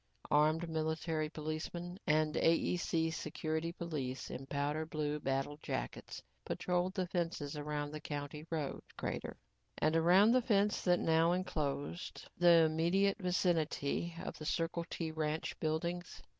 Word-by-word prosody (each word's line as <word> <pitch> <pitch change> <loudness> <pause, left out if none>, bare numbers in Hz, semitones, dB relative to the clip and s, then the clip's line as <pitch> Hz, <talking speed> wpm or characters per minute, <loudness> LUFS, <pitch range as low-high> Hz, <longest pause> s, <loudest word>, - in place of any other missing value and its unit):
Armed 155 +3 +4
military 160 0 -1
policemen 160 +4 -5
and 155 0 +3
AEC 165 -1 +2
security 160 +1 -2
police 150 -7 -4
in 135 +1 -6
powder 145 +2 -1
blue 150 -1 -2
battle 135 +1 -1
jackets, - - -4 0.2
patrolled 180 +1 -1
the 185 - 0
fences 165 -5 -2
around 145 0 -3
the 155 - -5
county 145 0 -5
road 155 -4 -2 0.2
crater. - - -4 0.4
And 155 +1 +2
around 180 +7 +6
the 255 +1 +5
fence 210 -3 +2
that 180 -1 +4
now 165 +1 +4
enclosed 155 -3 -3
the 170 -1 +7
immediate 175 +6 +2
vicinity 170 -3 0
of - - -6
the 155 - -6
Circle 170 0 -1
T 165 -2 -3
ranch 155 0 -2
buildings. 170 +3 -2
160 Hz, 130 wpm, -35 LUFS, 150-175 Hz, 0.4 s, the